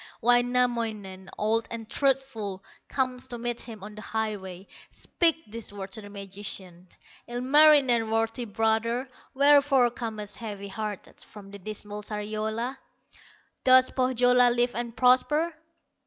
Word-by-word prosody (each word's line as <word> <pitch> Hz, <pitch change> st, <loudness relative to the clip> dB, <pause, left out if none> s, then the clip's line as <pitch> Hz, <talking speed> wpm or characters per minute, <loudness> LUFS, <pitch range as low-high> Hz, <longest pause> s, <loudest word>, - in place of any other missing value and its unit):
Wainamoinen, 235 Hz, -5 st, +1 dB
old 225 Hz, +2 st, +1 dB
and 230 Hz, -1 st, -7 dB
truthful, 230 Hz, -8 st, -1 dB, 0.2 s
Comes 255 Hz, -2 st, -1 dB
to 240 Hz, -, -6 dB
meet 240 Hz, 0 st, -3 dB
him 220 Hz, -5 st, -9 dB
on 210 Hz, +1 st, -8 dB
the 210 Hz, -, -10 dB
highway, 205 Hz, -5 st, -4 dB, 0.2 s
Speaks 330 Hz, -2 st, 0 dB
these 225 Hz, 0 st, -7 dB
words 195 Hz, -1 st, -8 dB
to 220 Hz, -, -7 dB
the 205 Hz, -, -11 dB
magician: 195 Hz, -3 st, -7 dB, 0.4 s
"Ilmarinen, 255 Hz, -2 st, +5 dB
worthy 225 Hz, +2 st, -1 dB
brother, 225 Hz, +4 st, 0 dB, 0.3 s
Wherefore 280 Hz, -3 st, +5 dB
comest 220 Hz, -4 st, -5 dB
heavy 205 Hz, -3 st, -7 dB
hearted 210 Hz, 0 st, -6 dB
From 200 Hz, -2 st, -13 dB
the 200 Hz, -, -9 dB
dismal 210 Hz, +1 st, -5 dB
Sariola? 215 Hz, +4 st, -3 dB, 0.8 s
Does 255 Hz, 0 st, +6 dB
Pohyola 250 Hz, -1 st, +4 dB
live 240 Hz, 0 st, +1 dB
and 235 Hz, -1 st, -4 dB
prosper?" 295 Hz, +6 st, +3 dB
225 Hz, 125 wpm, -27 LUFS, 210-250 Hz, 0.8 s, Does